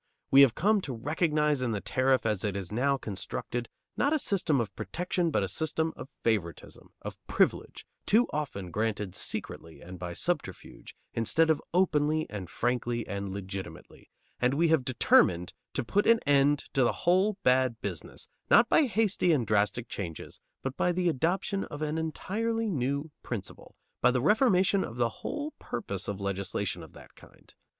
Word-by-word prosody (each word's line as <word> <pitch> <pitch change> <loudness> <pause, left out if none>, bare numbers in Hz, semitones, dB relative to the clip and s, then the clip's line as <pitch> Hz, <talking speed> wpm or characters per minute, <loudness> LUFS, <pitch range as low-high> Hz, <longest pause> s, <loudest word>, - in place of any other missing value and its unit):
We 135 - +8
have 135 -5 +6
come 210 +3 +3
to 135 - -5
recognize 150 +2 +1
in 120 -3 0
the 105 - -1
tariff 130 +4 +1
as 105 -3 0
it 105 -3 -1
is 95 -2 -4
now 135 +5 +1
constructed, 115 +2 -5 0.3
not 285 +4 +2
a - - +3
system 180 - +1
of 115 -3 -3
protection, 175 - -1
but 120 - +1
a - - -1
system 160 - -1
of 135 - -9
favoritism, 95 -9 -2
of - - -8
privilege, - - 0 0.2
too 230 +4 +5
often 120 -12 -4
granted 105 -2 -2
secretly 80 -1 -4
and 90 0 -10
by 90 -1 -5
subterfuge, - - -4 0.2
instead 160 +8 +3
of 155 - 0
openly 155 -3 +2
and 95 -4 -6
frankly 120 -1 -1
and 100 -1 -4
legitimately, 95 0 -8 0.3
and 125 +2 +2
we 165 +2 +3
have 160 -5 +3
determined 90 -8 +3 0.2
to 135 - 0
put 205 - +1
an 230 - +7
end 145 0 +3
to 135 - +2
the 120 - +3
whole 190 +4 +3
bad 125 -2 +3
business, 90 -6 -6 0.2
not 235 - +6
by 300 - +4
hasty 215 -6 +2
and 135 -7 +2
drastic 105 +3 +1
changes, 85 -8 -6 0.2
but 135 0 -3
by 180 - +1
the 175 0 +1
adoption 180 +6 0
of 145 +1 -6
an 155 +1 -1
entirely 220 +7 -2
new 140 +1 -2
principle, 110 -6 -7 0.3
by - - +5
the 125 0 +1
reformation 195 - +3
of 115 - -7
the 120 -1 +2
whole 300 +1 -4
purpose 95 -2 -5
of 100 -1 -4
legislation 100 -1 -2
of 80 - -12
that - - -15
kind. - - -19
135 Hz, 170 wpm, -29 LUFS, 105-170 Hz, 0.3 s, We